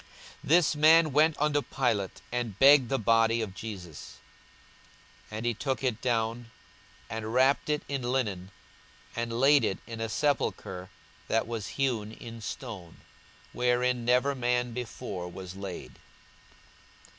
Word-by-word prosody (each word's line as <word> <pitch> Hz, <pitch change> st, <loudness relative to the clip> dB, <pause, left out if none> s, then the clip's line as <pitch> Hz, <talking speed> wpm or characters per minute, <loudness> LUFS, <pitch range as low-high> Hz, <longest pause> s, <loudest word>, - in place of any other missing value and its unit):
42:023:052 145 Hz, -, -9 dB
This 160 Hz, -2 st, +4 dB
man 155 Hz, +1 st, +6 dB
went 155 Hz, +2 st, +4 dB
unto 145 Hz, 0 st, +2 dB
Pilate, 115 Hz, -9 st, -1 dB
and 120 Hz, -5 st, -3 dB
begged 135 Hz, -1 st, +7 dB
the 135 Hz, -, +1 dB
body 115 Hz, 0 st, +3 dB
of 100 Hz, -4 st, -6 dB
Jesus. 90 Hz, -5 st, -8 dB, 1.1 s
42:023:053 110 Hz, -, -6 dB
And 110 Hz, -, -5 dB
he 120 Hz, -, +1 dB
took 135 Hz, +4 st, -3 dB
it 120 Hz, -4 st, -1 dB
down, 115 Hz, -1 st, -1 dB, 0.6 s
and 110 Hz, 0 st, -5 dB
wrapped 135 Hz, +3 st, +3 dB
it 150 Hz, 0 st, 0 dB
in 140 Hz, -2 st, -2 dB
linen, 115 Hz, -8 st, -2 dB, 0.7 s
and 115 Hz, 0 st, -2 dB
laid 140 Hz, +2 st, +5 dB
it 95 Hz, -, 0 dB
in 115 Hz, -1 st, -7 dB
a 115 Hz, -, -2 dB
sepulchre 95 Hz, -9 st, -1 dB, 0.4 s
that 115 Hz, -, +1 dB
was 115 Hz, -4 st, -4 dB
hewn 115 Hz, -6 st, -1 dB
in 115 Hz, 0 st, -10 dB
stone, 90 Hz, -5 st, -7 dB, 0.5 s
wherein 125 Hz, 0 st, +1 dB
never 125 Hz, +4 st, +3 dB
man 125 Hz, -2 st, 0 dB
before 100 Hz, -6 st, -5 dB
was 95 Hz, 0 st, -8 dB
laid. 95 Hz, -2 st, -8 dB
120 Hz, 140 wpm, -29 LUFS, 110-135 Hz, 1.1 s, begged